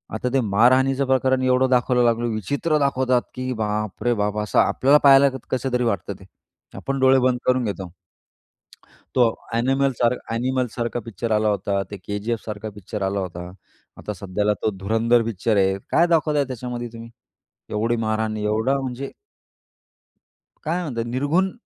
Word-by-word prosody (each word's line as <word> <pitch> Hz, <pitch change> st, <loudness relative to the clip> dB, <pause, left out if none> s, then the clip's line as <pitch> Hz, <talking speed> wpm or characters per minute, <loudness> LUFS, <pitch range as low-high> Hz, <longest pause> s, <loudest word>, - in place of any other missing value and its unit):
आता 125 Hz, +3 st, -2 dB
ते 135 Hz, -, +3 dB
मारहाणीचं 130 Hz, +6 st, +3 dB
प्रकरण 130 Hz, 0 st, +2 dB
एवढं 130 Hz, 0 st, +3 dB
दाखवलं 125 Hz, 0 st, +3 dB
लागलं 120 Hz, 0 st, +1 dB
विचित्र 145 Hz, -, -1 dB
दाखवतात, 130 Hz, -3 st, +2 dB
की 130 Hz, 0 st, -3 dB
बाप 105 Hz, -2 st, -3 dB
रे 120 Hz, +1 st, +2 dB
बाप! 105 Hz, -1 st, -1 dB
असं 105 Hz, 0 st, +1 dB
आपल्याला 140 Hz, +3 st, +4 dB
पाहायला 140 Hz, 0 st, +7 dB, 0.2 s
कसं 130 Hz, 0 st, -2 dB
तरी 125 Hz, 0 st, +1 dB
वाटतं 100 Hz, -4 st, -1 dB
ते. 95 Hz, -, -14 dB, 0.5 s
आपण 135 Hz, 0 st, -3 dB
डोळे 130 Hz, 0 st, +5 dB
बंद 125 Hz, -1 st, +2 dB
करून 125 Hz, 0 st, +2 dB
घेतो. 95 Hz, -3 st, -4 dB, 1.3 s
तो 120 Hz, -3 st, +4 dB, 0.2 s
एनिमल 135 Hz, +3 st, +2 dB
सार 120 Hz, 0 st, +4 dB, 0.2 s
एनिमल 130 Hz, +2 st, 0 dB
सारखा 120 Hz, 0 st, -2 dB
पिक्चर 115 Hz, +1 st, -4 dB
आला 110 Hz, 0 st, +2 dB
होता, 100 Hz, 0 st, -1 dB
ते 100 Hz, -, -5 dB
केजीएफ 105 Hz, +3 st, -3 dB
सारखा 105 Hz, 0 st, -5 dB
पिक्चर 105 Hz, +1 st, -7 dB
आला 95 Hz, +1 st, -1 dB
होता, 90 Hz, -1 st, -6 dB, 0.5 s
आता 105 Hz, -, -5 dB
सध्याला 105 Hz, +2 st, -1 dB
तो 110 Hz, -, +2 dB
धुरंधर 115 Hz, +4 st, +2 dB
पिक्चर 110 Hz, 0 st, -1 dB
आहे, 95 Hz, 0 st, +2 dB
काय 170 Hz, -, +4 dB
दाखवताय 155 Hz, -4 st, +2 dB
त्याच्यामध्ये 125 Hz, -1 st, -5 dB
तुम्ही, 115 Hz, 0 st, -9 dB, 0.6 s
एवढी 115 Hz, +3 st, 0 dB
मारहाण, 110 Hz, -1 st, -1 dB
एवढा 110 Hz, +6 st, 0 dB
म्हणजे 130 Hz, +1 st, -5 dB, 1.5 s
काय 170 Hz, +3 st, -1 dB
म्हणतात 120 Hz, -9 st, -3 dB
निर्घुन 145 Hz, +10 st, 0 dB
120 Hz, 155 wpm, -22 LUFS, 105-130 Hz, 1.5 s, पाहायला